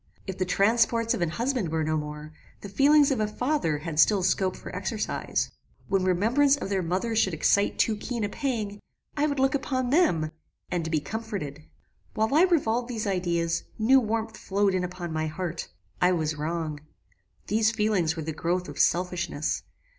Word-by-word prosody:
If 190 -1 -6
the 185 - +1
transports 230 +4 +2
of - - -3
an 170 - +1
husband 235 - -1
were 160 0 0
no 155 0 0
more, 150 0 -5 0.3
the 200 - -7
feelings 285 +6 +5
of 260 - 0
a 215 - +1
father 245 - 0
had 155 0 -4
still 200 +1 +5
scope 185 0 +1
for - - -9
exercise. - - -2 0.4
When 195 -1 +2
remembrance 235 +11 +3
of 195 - -5
their 195 -2 0
mother 185 +7 -1
should 190 -6 +2
excite 200 +6 +2
too 220 - +2
keen 230 +2 -4
a 205 - 0
pang, 215 -5 -3 0.4
I 295 +1 +2
would 285 -2 -2
look 270 0 +3
upon 260 -3 -1
them, 170 - +3 0.4
and 165 -2 -1
BE 155 -2 0
COMFORTED. 160 - -5 0.5
"While 220 +3 +1
I 325 +5 +6
revolved 245 -9 +1
these 225 -3 -3
ideas, 170 -3 0
new 255 +5 +5
warmth 225 -1 -2
flowed 200 0 +1
in 185 -1 0
upon 180 -2 -5
my 155 0 -1
heart 170 +1 -4 0.3
I 180 +1 +4
was 160 -2 0
wrong. 155 0 -3 0.7
These 215 +1 +2
feelings 210 -8 +1
were 160 - -4
the 160 +1 -4
growth 175 +3 -1
of - - -8
selfishness. 175 -4 0
195 Hz, 180 wpm, -27 LUFS, 165-230 Hz, 0.7 s, I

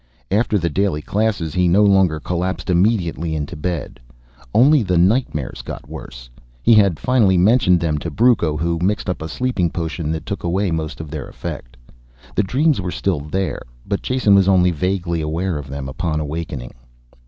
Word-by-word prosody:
After 110 +1 +2
the 85 -3 -1
daily 85 -2 -1
classes 100 -7 -1
he 90 -1 +2
no 95 +5 +4
longer 95 -6 +3
collapsed 90 +3 -2
immediately 85 -4 +1
into 75 -2 -4
bed. 80 -3 -4 0.5
Only 140 +5 +5
the 90 -4 0
nightmares 90 - +1
got - - -8
worse. - - -9 0.4
He 115 - +6
had 100 -7 +4
finally 110 -8 +3
mentioned 90 -2 +4
them 75 -3 0
to 85 - -4
Brucco, 85 -5 +2
who 85 +2 -1
mixed 100 0 0
up 90 - -6
a 80 - -5
sleeping 110 -4 -1
potion 80 -1 -4
that 80 - -5
took 100 - -5
away 90 +2 0
most 80 -1 -3
of 80 -2 -9
their 75 -5 -5
effect. - - -8 0.6
The - - +2
dreams 135 +5 +1
were 90 - -3
still 90 -2 -1
there, 90 +6 -3 0.2
but 100 - -2
Jason 130 -5 +2
was 100 -1 +5
only 90 -2 +4
vaguely 85 0 -1
aware 80 +2 -2
of 70 - -8
them 70 0 -5
upon 75 +3 -2
awakening. 75 -4 -5
90 Hz, 175 wpm, -20 LUFS, 80-100 Hz, 0.6 s, He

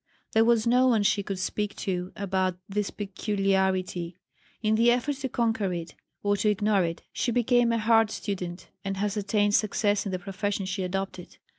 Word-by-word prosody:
There 220 - +4
was 230 -1 +3
no 250 +2 +4
one 225 -4 +3
she 200 0 +2
could 195 -1 -4
speak 205 +2 -2
to 180 -2 -3
about 190 -2 -1
this 205 0 -1
peculiarity. 190 -3 -1 0.5
In 215 0 +3
the 230 +2 +4
effort 250 +4 +1
to 265 -1 -3
conquer 225 -5 0
it, 165 -2 -5 0.3
or 205 0 +2
to 210 +2 +2
ignore 205 -1 +2
it, 165 0 -3
she 245 - 0
became 245 0 +3
a 230 - +2
hard 225 0 +4
student 180 -4 -5
and 195 -1 -3
has 205 +1 -1
attained 205 0 +1
success 205 -1 +2
in - - -3
the 185 - -1
profession 195 +1 -3
she 190 +1 -3
adopted. 185 -1 -4
205 Hz, 180 wpm, -27 LUFS, 190-220 Hz, 0.5 s, There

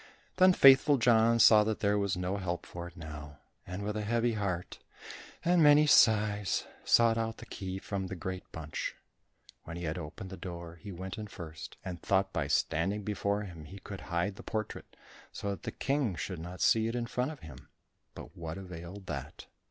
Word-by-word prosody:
Then 185 0 +7
Faithful 135 0 +7
John 115 -1 +4
saw 110 -2 +7
that 110 0 -1
there 100 0 +2
was 100 -3 0
no 90 +2 -2
help 90 -3 -3
for 85 0 -7
it 85 - -14
now, 75 -2 -8 0.3
and 90 +3 -5
with 105 +1 -2
a 110 - -1
heavy 115 +2 +1
heart 95 -5 -3 0.7
and 175 0 +4
many 150 0 +7
sighs, 105 -7 +4 0.2
sought 115 -1 +4
out 115 0 -2
the - - -10
key 95 -1 -5
from 95 -1 -4
the 95 - -5
great 95 +2 -6
bunch. 80 -1 -5 0.7
When 85 +1 -6
he 85 - -6
had 80 +1 -2
opened 90 +5 -8
the 95 - -7
door, 85 -2 -7
he 100 +5 -9
went 95 +3 -6
in 105 - -5
first, 80 -5 -9
and 90 -2 -5
thought 95 0 +1
by 80 -4 -1
standing 90 +8 0
before 100 +1 -1
him 85 -6 -9
he 95 +6 -10
could 100 -1 -8
hide 90 +4 -2
the - - -8
portrait 110 -1 -5 0.4
so 100 - -4
that 100 - -6
the - - -4
King 135 -8 -1
should 90 +1 -4
not 90 +3 -8
see 110 0 +4
it 115 - -3
in 120 -1 -1
front 125 +3 -1
of 155 -3 -9
him, 75 -5 -12 0.5
but - - -10
what 80 0 -6
availed 90 +1 -8
that? - - -6
100 Hz, 200 wpm, -31 LUFS, 85-110 Hz, 0.7 s, Then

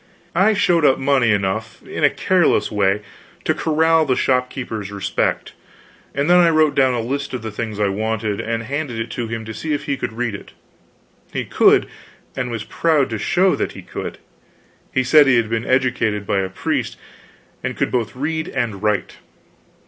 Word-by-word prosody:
I 195 +5 +4
showed 175 -4 +2
up 135 - +5
money 135 -4 +2
enough, 105 +2 -2
in - - -5
a - - +7
careless - - +2
way, 100 0 +1 0.4
to - - +2
corral 160 +1 +2
the 135 -4 +1
shopkeeper's 125 -6 -1
respect, 100 -1 -2 0.6
and 140 +2 0
then 180 +1 +6
I 170 -1 +6
wrote 155 -2 +3
down 130 -2 +3
a - - -1
list 140 +3 -3
of 125 - -6
the 110 - -4
things 110 0 -5
I 105 - +2
wanted, 110 +1 -2
and 115 0 -3
handed 140 0 -3
it 115 +1 -4
to 120 -2 -3
him 115 0 -5
to 110 - -6
see 155 +6 -3
if - - -5
he 140 -2 -2
could 120 - -4
read 120 -1 -2
it. 100 - -9 0.8
He - - -3
could, - - +4 0.5
and 125 -2 -2
was 115 -3 -4
proud 150 -1 +1
to 110 - -3
show 185 - +2
that - - -2
he - - -10
could. - - -6 0.7
He 130 - +1
said 145 +3 +6
he 135 - +5
had 115 -1 0
been 115 +1 -1
educated 120 -5 +1
by 100 - +1
a 95 -1 -1
priest, 95 - -2 0.7
and - - -3
could - - 0
both 120 -3 -1
read 160 +4 -2
and 105 -5 -3
write. 105 -2 -1
120 Hz, 190 wpm, -20 LUFS, 110-140 Hz, 0.8 s, a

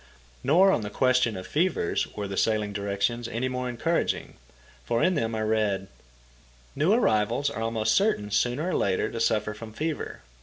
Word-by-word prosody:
Nor 185 +7 +5
on 120 - +1
the 105 - -4
question 125 -2 +2
of 95 - -7
fever 165 - 0 0.2
were 105 -1 -3
the 95 - -5
"Sailing 105 -1 +1
Directions" 100 +4 -1
any 120 +4 -2
more 125 0 -3
encouraging, 160 +8 -1 0.5
for 115 0 0
in 185 - +3
them 115 -8 -1
I 110 - -2
read: 105 -3 0 0.9
"New 155 +7 +2
arrivals 120 - +2
are 110 - -5
almost 110 -1 0
certain 150 - +1
sooner 125 - +1
or - - -1
later 95 -2 0
to 115 - -4
suffer 105 -1 +1
from 110 +1 -9
fever. 155 +4 -4
115 Hz, 175 wpm, -26 LUFS, 105-140 Hz, 0.9 s, Nor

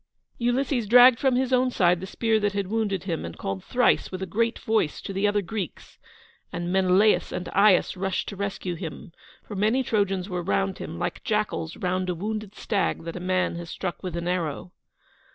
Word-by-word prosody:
Ulysses 245 -1 0
dragged 245 +2 +8
from 265 -2 +2
his 260 0 +1
own 255 0 +3
side 180 -7 +3
the 190 - -5
spear 225 +2 +1
that 205 -1 0
had 200 -1 -1
wounded 205 -2 -1
him, 170 -4 -3
and 85 - -7
called 95 -1 -4
thrice 250 -1 +2
with 185 0 -4
a - - -1
great 230 +6 0
voice 220 -9 0
to 195 - -6
the 195 +2 +1
other 205 0 +1
Greeks, 195 -2 -6 0.5
and 175 0 -3
Menelaus 190 +3 +3
and 180 - -4
Aias 200 -2 +4
rushed 190 0 -2
to 200 - -7
rescue 195 -2 -3
him, 165 +1 -7 0.3
for 210 - -8
many 220 +7 +2
Trojans 195 -5 0
were 180 -3 -3
round 195 +1 -1
him, 165 - -6
like 175 - -3
jackals 210 -6 -1
round 185 0 -1
a 180 - -1
wounded 210 +2 -4
stag 200 -6 -1
that 165 0 -6
a - - -4
man 185 -1 0
has 170 -1 -7
struck 180 +1 -4
with 180 -3 -4
an 170 0 -3
arrow. 175 -1 -2
195 Hz, 200 wpm, -25 LUFS, 180-220 Hz, 0.5 s, dragged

